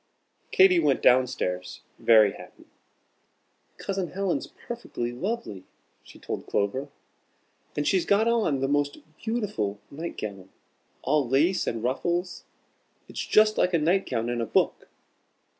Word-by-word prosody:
Katy 185 -2 +6
went 145 -4 +1
down 125 +1 +6
stairs 90 -6 -4 0.2
very 110 -3 +6
happy. - - -14 1.1
"Cousin 195 -2 -3
Helen's 195 -2 -1
perfectly 230 - -6
lovely," 150 - -4 0.4
she - - -16
told - - -6
Clover. 130 +8 -1 0.9
"And 145 0 0
she's 185 -3 +3
got 210 +3 +3
on 215 - +1
the 135 - +1
most 145 0 0 0.2
beautiful 205 - -2
night 160 +4 -6
gown, 100 -3 -6 0.5
all 140 -2 +1
lace 160 +8 +2
and 115 -1 -2
ruffles. 175 +8 -2 0.6
It's - - -5
just 215 0 +4
like 180 -1 +3
a - - +5
night 175 +5 +1
gown 115 -2 -1
in 120 -1 -1
a 115 - -2
book." - - +1
145 Hz, 135 wpm, -26 LUFS, 120-190 Hz, 1.1 s, Katy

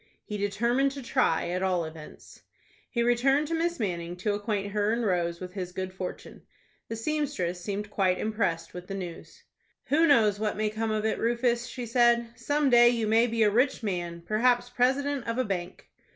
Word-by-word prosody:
He 210 - -5
determined 235 +7 +1
to 275 -1 -7
try, 235 -10 +1
at 180 +1 -2
all 180 -3 +1
events. 160 -1 -12 0.5
He 235 - 0
returned 270 +5 +2
to - - -2
Miss 340 0 -1
Manning 175 -5 -3
to 205 +3 -1
acquaint 205 -1 -2
her 210 +1 +1
and 235 0 0
Rose 170 -3 0
with 180 -1 -8
his 185 -2 -5
good 185 0 -4
fortune. 185 -1 -7 0.5
The 225 - -4
seamstress 225 - -2
seemed 205 +2 -4
quite 185 -3 +2
impressed 210 -6 -2
with 180 0 -8
the 195 - -5
news. 175 -4 -8 0.5
"Who 320 +4 +4
knows 215 -8 +4
what 215 -1 -1
may 215 0 0
come 220 +1 -2
of 215 0 -1
it, 220 - 0
Rufus?" 240 +1 +1
she 250 -1 -6
said. 235 0 +3
"Some 290 -2 0
day 240 0 +7
you 235 -2 0
may 225 +2 +4
be 230 -1 +1
a 210 - +4
rich 250 +3 +1
man,—perhaps 215 +7 0
president 265 +2 0
of 230 +1 -2
a 255 - +1
bank." 180 -3 -5
215 Hz, 190 wpm, -28 LUFS, 185-245 Hz, 0.5 s, day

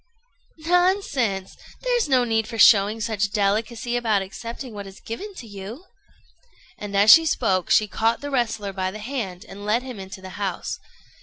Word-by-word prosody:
"] - - -39
"Nonsense! 320 - +1 0.3
There's - - +1
no 255 -2 +4
need 225 -2 0
for 230 0 -6
showing 210 +1 +5
such 210 -2 0
delicacy 220 +4 0
about 220 -5 +1
accepting 230 +5 -8
what 200 -1 -7
is 195 0 -12
given 395 - -7
you." 220 - -9 0.9
And 200 -1 -4
as 205 +2 +7
she 325 0 +8
spoke, 190 - 0
she 215 - +4
caught 225 +2 0
the 285 0 -6
wrestler 225 -6 -1
by 185 -1 -2
the 200 - -7
hand 215 -6 -5
and 200 +1 -10
led 215 +4 +1
him 255 -5 -8
into 190 0 -8
the 190 0 -9
house. 195 -3 -3
220 Hz, 170 wpm, -23 LUFS, 200-250 Hz, 0.9 s, she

